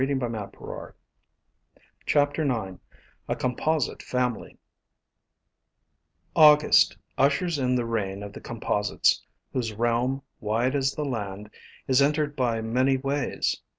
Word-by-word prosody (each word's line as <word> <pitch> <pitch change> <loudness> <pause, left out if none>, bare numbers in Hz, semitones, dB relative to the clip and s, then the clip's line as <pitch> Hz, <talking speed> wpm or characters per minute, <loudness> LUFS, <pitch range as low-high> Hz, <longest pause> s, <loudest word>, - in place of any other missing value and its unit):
IX 135 +1 +1
A 115 -5 -6 2.4
COMPOSITE 140 +4 -1
FAMILY 125 -2 -2 1.8
UGUST 150 -1 +6 0.2
ushers 145 +4 +2
in 125 -1 +1
the 120 -1 0
reign 100 -4 -2
of 100 0 -8
the - - -9
Composites, 105 -3 0 0.3
whose 115 -4 -2
realm, 120 +4 0 0.2
wide 115 +5 0
as 135 -1 0
the 150 - -2
land, 105 -5 -5 0.4
is 130 +1 +4
,entered 150 +1 +1
by 120 -4 0
many 130 +4 +2
ways. 140 +1 -1
125 Hz, 100 wpm, -26 LUFS, 115-140 Hz, 2.4 s, UGUST